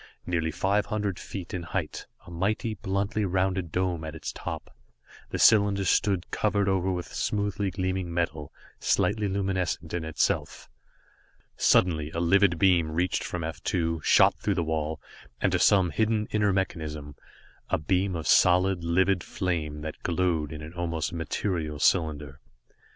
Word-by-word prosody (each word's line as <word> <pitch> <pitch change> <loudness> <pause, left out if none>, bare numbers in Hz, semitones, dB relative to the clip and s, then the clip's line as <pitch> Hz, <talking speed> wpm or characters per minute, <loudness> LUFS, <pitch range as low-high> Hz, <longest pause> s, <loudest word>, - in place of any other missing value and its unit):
Nearly 85 -2 0
five 100 +6 0
hundred 105 -3 -2
feet 95 -4 -7
in 90 - -2
height, 85 -1 -4 0.2
a 85 - -11
mighty, 105 +6 -1
bluntly 100 +1 -2
rounded 95 -2 0
dome 90 -2 -1
at 80 0 -6
its 80 - -5
top, - - -7 0.5
the - - -3
cylinder 100 -2 +5
stood, 95 -1 +1
covered 100 -2 +1
over 95 -1 +1
with 90 -1 -5
smoothly 100 -1 -1
gleaming 95 -1 -2
metal, 80 -4 -2 0.3
slightly 105 -2 +1
luminescent 95 -4 -2
in 85 -2 -2
itself. 80 -1 -1 0.9
Suddenly, 80 -5 +3
a - - 0
livid 90 +1 +3
beam 90 -4 +3
reached 90 +3 0
from 90 -2 -4
F 80 0 -5
2, 85 -3 -1
shot - - +5
through 100 - 0
the 85 - 0
wall, 80 -1 -2 0.4
and - - +1
to - - +1
some 95 -4 +4
hidden 110 -1 +1
inner 105 -1 +2
mechanism 75 -6 -3 0.5
a - - +2
beam 95 +4 0
of 80 - -4
solid, 90 0 +4
livid 95 +2 +2
flame 80 -6 -3
that 80 0 -7
glowed 85 -4 0
in 75 0 -7
an 80 +2 -9
almost 85 -2 -2
material 80 -2 -2
cylinder. 75 -3 +1
90 Hz, 150 wpm, -27 LUFS, 80-95 Hz, 0.9 s, cylinder